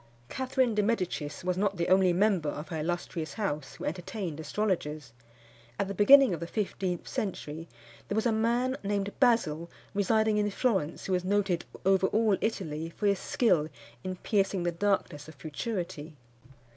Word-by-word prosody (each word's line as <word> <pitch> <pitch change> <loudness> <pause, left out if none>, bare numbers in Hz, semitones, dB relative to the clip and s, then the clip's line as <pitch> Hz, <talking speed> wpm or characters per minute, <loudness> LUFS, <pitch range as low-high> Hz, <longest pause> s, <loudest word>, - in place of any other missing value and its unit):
Catherine 260 -2 0
di 210 - +2
Medicis 180 -8 -2
was 180 0 0
not 200 -1 +1
the 170 - 0
only 185 0 +5
member 185 -4 +2
of 150 +2 -6
her 160 - -3
illustrious 165 -1 -3
house 150 - -3
who - - -7
entertained 180 -1 -4
astrologers. 155 - -2 0.6
At 200 - 0
the 200 - -3
beginning 265 +4 +7
of 170 - -3
the 170 - -5
fifteenth 190 -3 -2
century 165 -5 -4 0.4
there 205 - -2
was 220 - +1
a 235 - +3
man, 240 +4 +1
named 200 0 -1
Basil, 170 - +2 0.2
residing 215 +1 +2
in 205 0 +1
Florence, 195 - 0
who 190 - -1
was 180 -1 +1
noted 190 -2 +1 0.2
over 190 0 +4
all 215 -1 +3
Italy 165 -7 -2
for 205 - -5
his 200 -2 +3
skill 170 -11 +2 0.3
in 185 0 -3
piercing 195 -1 0
the 175 - +1
darkness 170 -5 -1
of 155 - -11
futurity. 160 0 -5
190 Hz, 165 wpm, -29 LUFS, 165-210 Hz, 0.6 s, beginning